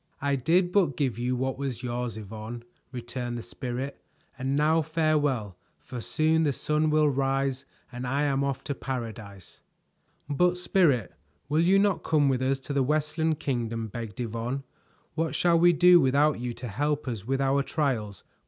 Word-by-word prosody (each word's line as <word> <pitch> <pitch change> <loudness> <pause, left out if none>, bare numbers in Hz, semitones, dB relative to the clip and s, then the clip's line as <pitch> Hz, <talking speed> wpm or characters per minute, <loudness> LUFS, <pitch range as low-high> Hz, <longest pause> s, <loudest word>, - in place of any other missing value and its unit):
"I 140 0 +1
did 175 +7 +2
but 175 -10 +2
give 130 -5 -1
you 125 +1 0
what 130 +1 -2
was 130 -4 -4
yours, 120 -2 -3
Yvonne," 110 +3 -7 0.3
returned 120 -1 -5
the 115 - -6
Spirit, 125 +3 -5 0.3
"and 135 +1 -2
now 155 +3 +3
farewell, 150 - 0 0.2
for 125 -2 -8
soon 160 +6 +2
the 150 -3 +2
sun 150 +3 0
will 155 0 +4
rise 135 -1 0 0.3
and 125 0 -5
I 140 +3 0
am 140 -1 +1
off 140 -2 -2
to 145 - -3
paradise." 110 -8 -7 0.7
"But, 175 +5 +2
Spirit, 165 - +2 0.4
will 155 +2 +3
you 185 +3 +4
not 200 -1 +2
come 150 -3 +3
with 130 -1 0
us 135 +1 +1
to 140 - -5
the 140 - +2
Westland 155 +3 0
Kingdom?" 115 -4 -2
begged 115 -1 -7
Yvonne. 120 +3 -3 0.5
"What 165 +1 -1
shall 170 -1 +3
we 175 +1 +6
do 175 +1 +7
without 140 +1 +3
you 120 -1 -4
to 120 +1 -6
help 145 +7 -1
us 110 -4 -4
with 135 0 0
our 135 +1 +2
trials? 125 - -2
135 Hz, 170 wpm, -27 LUFS, 120-150 Hz, 0.7 s, do